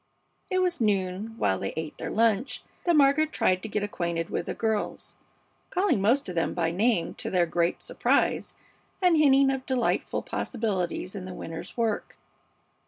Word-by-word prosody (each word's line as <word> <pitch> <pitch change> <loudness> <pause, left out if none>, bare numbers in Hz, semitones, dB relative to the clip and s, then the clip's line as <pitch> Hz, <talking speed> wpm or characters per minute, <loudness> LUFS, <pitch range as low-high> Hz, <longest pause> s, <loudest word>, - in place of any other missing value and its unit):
It 370 0 +2
was 360 -1 0
at - - -9
noon, 200 +1 0
while 95 - +1
they 95 - -3
ate 160 -1 -5
their - - -4
lunch, 225 +3 +1 0.2
that 345 -1 +4
Margaret 295 +2 +4
tried 185 0 +2
to - - -5
get 210 -1 -1
acquainted 170 -4 -2
with - - -2
the - - -3
girls, 220 -2 -2 0.5
calling 365 - +1
most 240 +8 +2
of 180 - -4
them 165 -1 -1
by 165 -2 +1
name, 190 -2 +1
to - - -5
their 180 -2 +3
great 170 +1 0
surprise, - - +1 0.4
and 360 -3 +4
hinting 275 -3 +5
of 265 -1 -3
delightful 255 -3 0
possibilities 195 -6 -2
in 195 -3 -6
the 185 -1 -7
winter's 165 +7 -7
work. 225 -3 -1
215 Hz, 170 wpm, -27 LUFS, 180-270 Hz, 0.5 s, hinting